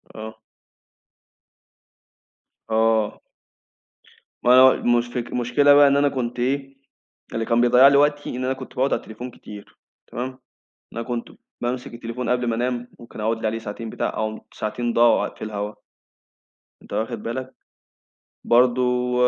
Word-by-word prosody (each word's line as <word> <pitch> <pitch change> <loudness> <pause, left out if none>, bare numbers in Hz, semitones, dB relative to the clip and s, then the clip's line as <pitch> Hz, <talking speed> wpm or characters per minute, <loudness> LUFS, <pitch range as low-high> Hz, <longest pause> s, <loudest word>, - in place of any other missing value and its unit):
آه. 110 0 -8 2.3
آه. 110 -1 +1 1.2
ما 130 +1 +7 0.2
مش 120 0 -1
فك 120 0 -4
المشكلة 125 +4 +3
بقى 145 0 +7
إن 140 0 +3
أنا 145 0 +3
كنت 125 -2 -4
إيه، 135 +2 -2 0.6
اللي 115 0 -2
كان 115 0 +2
بيضيع 125 +2 +7
لي 140 0 +5
وقتي 145 0 +2
إن 125 +1 -4
أنا 130 - 0
كنت 130 -1 -10
باقعد 135 +2 +1
على - - +1
التليفون 120 +3 -9
كتير 105 -2 -13 0.3
تمام؟ 130 +2 -5 0.5
أنا 115 - -4
كنت 120 0 -4 0.3
بامسك 125 0 -4
التليفون 120 +1 -5
قبل 125 0 +1
ما 115 - 0
أنام 120 0 -2
ممكن 115 -2 -10
أقعد 110 +1 -1
لي 110 - -2
عليه 115 +1 -1
ساعتين 110 +1 -7
بتاع - - -2
أهُم 110 0 -3
ساعتين 120 +3 -3
ضاعوا 115 -1 +4
في - - -8
الهوا. 105 0 -4 1.1
أنت - - -12
واخد 115 -1 -3
بالك. 130 +3 -5 0.9
برضه 125 0 +2
120 Hz, 145 wpm, -23 LUFS, 115-130 Hz, 2.3 s, ما